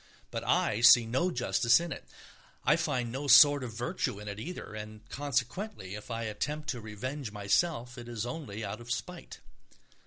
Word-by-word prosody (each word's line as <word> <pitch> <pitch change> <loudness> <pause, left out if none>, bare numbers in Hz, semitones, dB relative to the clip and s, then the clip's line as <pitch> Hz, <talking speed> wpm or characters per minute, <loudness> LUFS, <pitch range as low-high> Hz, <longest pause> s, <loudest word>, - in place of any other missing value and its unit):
But - - -4
I 105 - +1
see 115 0 +8
no 130 +11 0
justice 120 -4 +3
in 170 -1 -5
it, - - -7 0.6
I - - +5
find 120 -2 -1
no 135 +4 -4
sort 145 +1 +8
of 120 -3 -6
virtue 120 -4 -2
in 105 - -9
it 100 0 -5
either, 170 -4 -7
and 110 0 -9
consequently 140 - -3
if 105 +2 -8
I 115 0 -3
attempt 150 +8 -4
to 120 - -3
revenge 115 +4 -5
myself, 120 - 0
it 120 0 -9
is 115 -1 -3
only 115 -7 -5
out 105 +3 -6
of 120 +1 -8
spite. - - -5
120 Hz, 180 wpm, -30 LUFS, 110-145 Hz, 0.6 s, see